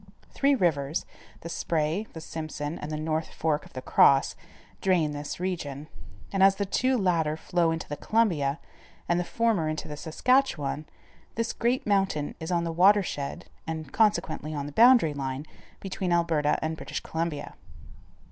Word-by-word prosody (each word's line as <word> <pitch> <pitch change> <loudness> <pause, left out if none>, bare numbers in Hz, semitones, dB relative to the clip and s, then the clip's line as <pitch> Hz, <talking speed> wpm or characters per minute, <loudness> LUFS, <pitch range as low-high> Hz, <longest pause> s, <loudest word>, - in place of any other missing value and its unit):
Three 280 0 +3
rivers, 155 - 0 0.4
the - - -7
Spray, 165 +5 -1
the 160 - -7
Simpson, 155 -1 -5
and 150 - -6
the 155 - -2
North 155 +1 -2
Fork 155 -2 -1
of - - -23
the 130 - -6
Cross, 135 +1 +4 0.5
drain 175 -6 +2
this 145 +2 -5
region, 155 -5 -4 0.4
and 195 - +1
as 195 0 +6
the 200 - -1
two 255 +6 +1
latter 165 -6 +1
flow 175 0 +1
into 165 0 -3
the 145 - -4
Columbia, 165 -11 +1 0.5
and 175 0 +2
the - - 0
former 215 -6 +1
into 155 0 -4
the 150 - -6
Saskatchewan, 160 - 0 0.5
this 230 0 -1
great 240 +2 0
mountain 195 -8 +1
is 160 +2 -5
on 170 -1 +1
the 165 - -2
watershed, 180 -5 +2 0.2
and 160 -3 -5
consequently 170 -7 +1
on 140 -1 -3
the 145 - -6
boundary 230 - +6
line 135 0 -4 0.3
between 190 -2 -3
Alberta 165 -4 +2
and 160 0 -2
British - - -5
Columbia. 160 -3 -3
165 Hz, 160 wpm, -27 LUFS, 150-195 Hz, 0.5 s, as